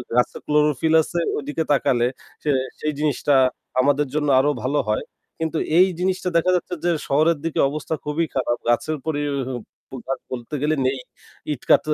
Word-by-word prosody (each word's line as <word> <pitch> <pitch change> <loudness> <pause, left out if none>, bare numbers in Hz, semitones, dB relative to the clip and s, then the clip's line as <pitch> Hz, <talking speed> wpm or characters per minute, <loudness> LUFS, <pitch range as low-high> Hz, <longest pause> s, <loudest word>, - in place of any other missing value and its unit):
গাছে 125 - +2
chlorophyll 150 +1 +2
আছে 170 +2 -3 0.2
ওদিকে 145 +3 -2
তাকালে, 120 -3 +2 0.4
সে 150 - -1 0.3
সেই 155 0 -1
জিনিসটা 145 -1 +1 0.5
আমাদের 145 +1 +2
জন্য 150 -1 0
আরও 145 +2 +3
ভালো 140 +3 +1
হয়। 105 - 0 0.4
কিন্তু 160 0 -1 0.2
এই 185 +1 +7
জিনিসটা 185 0 0
দেখা 180 +2 +3
যাচ্ছে 180 0 -2
যে 175 - +3 0.2
শহরের 155 +3 +3
দিকে 165 - -1
অবস্থা 155 +2 -4
খুবই 150 +3 0
খারাপ। 120 -2 0
গাছের 150 +6 +1
পরিবে 145 -2 -1 0.6
ব - - -15 0.4
বলতে 125 +3 -5
গেলে 150 +1 +2
নেই। 130 0 -1 0.5
ইট, 130 - -9
কাঠ, - - +6
150 Hz, 160 wpm, -22 LUFS, 140-160 Hz, 0.6 s, এই